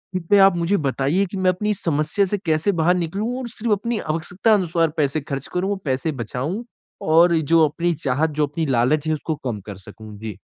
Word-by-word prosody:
इस 185 - 0
पे 205 - +6
आप 195 -2 +6
मुझे 170 +4 +1
बताइए 140 +7 +1
कि 195 - -4
मैं 185 -1 +2
अपनी 210 +4 -1
समस्या 155 +2 0
से 205 +2 -1
कैसे 160 +4 +2
बाहर 175 +3 +3
निकलूँ 200 +8 -2
और 255 - -5
सिर्फ़ 225 -1 -1
अपनी 225 +2 -2
आवश्यकता 170 +7 0
अनुसार 170 -4 +2
पैसे 150 0 +1
खर्च 140 -1 -5
करूँ 185 +3 0
और 200 - -2
पैसे 130 +3 -1
बचाऊँ? 150 - -4 0.4
और 170 +2 +4
ये 160 - +2
जो 160 +2 +4
अपनी 170 +4 -1
चाहत 140 +5 +1
जो 150 - +3
अपनी 155 +3 -3
लालच 135 +4 +1
है 155 - +2
उसको 155 +1 -3
कम 110 -5 -3
कर 100 -3 -7
सकूँ। 105 +2 -12
जी। 110 -3 -7
160 Hz, 215 wpm, -22 LUFS, 140-190 Hz, 0.4 s, पे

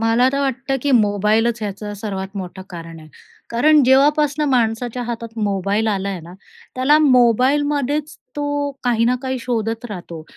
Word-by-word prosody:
मला 230 +3 +3
तर 275 - 0
वाटतं, 270 0 -1
की 285 - 0
मोबाईलच 215 +1 +2
याचं 205 +1 -5
सर्वात 195 -1 -5
मोठं 190 0 -6
कारण 165 -1 -9
आहे. 155 - -14 0.4
कारण 295 +5 +4
जेव्हापासनं 295 +3 +3
माणसाच्या 240 0 0
हातात 230 -1 -6
मोबाईल 200 +1 0
आला 200 -2 -1
आहे 190 -3 -4
ना, 175 +2 -12 0.4
त्याला 275 +4 +4
मोबाईलमध्येच 285 +3 +2 0.2
तो 290 0 -1
काही 230 -2 +2
ना 245 - +3
काही 260 0 -2
शोधत 230 -1 -2
राहतो 170 -4 -8
235 Hz, 150 wpm, -19 LUFS, 205-270 Hz, 0.4 s, कारण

